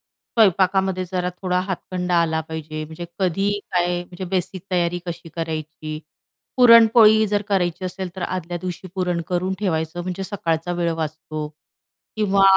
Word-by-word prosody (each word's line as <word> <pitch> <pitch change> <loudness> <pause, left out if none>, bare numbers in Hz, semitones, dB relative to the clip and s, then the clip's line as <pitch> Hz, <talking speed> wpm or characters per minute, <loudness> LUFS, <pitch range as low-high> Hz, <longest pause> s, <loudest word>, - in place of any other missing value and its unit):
स्वयंपाकामध्ये 190 -3 +2
जरा 180 0 0
थोडा 180 0 +1
हातखंडा 180 -1 -3
आला 160 -1 0
पाहिजे, 155 -1 -5
म्हणजे 160 +3 -8
कधी 195 +2 +1 0.2
काय 175 0 +2
म्हणजे 180 +1 -8
बेसिक 185 0 -2
तयारी 175 -1 +1
कशी 170 0 -6
करायची. 155 -1 -4 0.6
पुरणपोळी 225 -3 +7
जर 205 0 +1
करायची 185 -2 0
असेल 185 0 -4
तर 185 - -4
आदल्या 175 -1 -3
दिवशी 185 0 -5
पुरण 180 -2 0
करून 185 +1 0
ठेवायचं, 170 -3 -1
म्हणजे 185 +1 -4
सकाळचा 175 -4 -1
वेळ 170 -1 +1
वाचतो. 155 -1 -4 0.7
किंवा 200 -2 +3
180 Hz, 140 wpm, -22 LUFS, 165-190 Hz, 0.7 s, पुरणपोळी